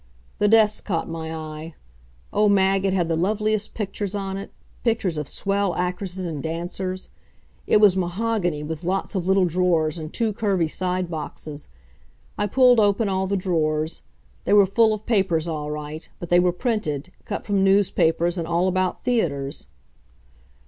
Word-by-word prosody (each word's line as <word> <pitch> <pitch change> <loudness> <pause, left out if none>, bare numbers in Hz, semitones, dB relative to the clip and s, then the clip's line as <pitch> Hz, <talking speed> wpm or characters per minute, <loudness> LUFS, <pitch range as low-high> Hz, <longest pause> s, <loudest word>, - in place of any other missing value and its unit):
The 205 - +3
desk 215 0 +4
caught 170 -6 -2
my 160 -1 -5
eye. 155 0 -7 0.6
Oh, 210 0 +4
Mag, 195 -1 +3
it 190 - +1
had 175 -3 +1
the 165 - 0
loveliest 215 +4 0
pictures 205 -1 -3
on 195 -1 -3
it 195 +1 -7 0.3
pictures 220 -7 0
of 150 -2 -3
swell 195 +2 -1
actresses 180 +1 -2
and 155 -4 -4
dancers. 175 +4 -4 0.6
It - - +5
was 205 -3 +6
mahogany, 180 -3 -1
with 160 +2 -5
lots 190 +5 -1
of 185 -3 -2
little 190 -1 +4
drawers 170 -2 +1
and 155 0 -6
two 225 -3 -1
curvy 195 -5 +1
side 180 +1 -2
boxes. 150 -1 -5 0.7
I 205 - 0
pulled 250 +2 +5
open 205 +1 +3
all 190 0 0
the 200 +1 0
drawers. 160 -4 -1 0.4
They - - +2
were 205 -1 +7
full 220 +3 +3
of 215 0 -4
papers 190 -8 +1
all 150 -2 -3
right, 150 +1 -6
but 175 - -8
they 175 - +5
were 180 0 +3
printed, 180 - -2
cut 205 - -4
from 200 -2 +1
newspapers, 175 -3 +2
and 165 - -3
all 170 +2 +1
about 185 0 0
theaters. 150 - -1
185 Hz, 165 wpm, -23 LUFS, 165-200 Hz, 0.7 s, were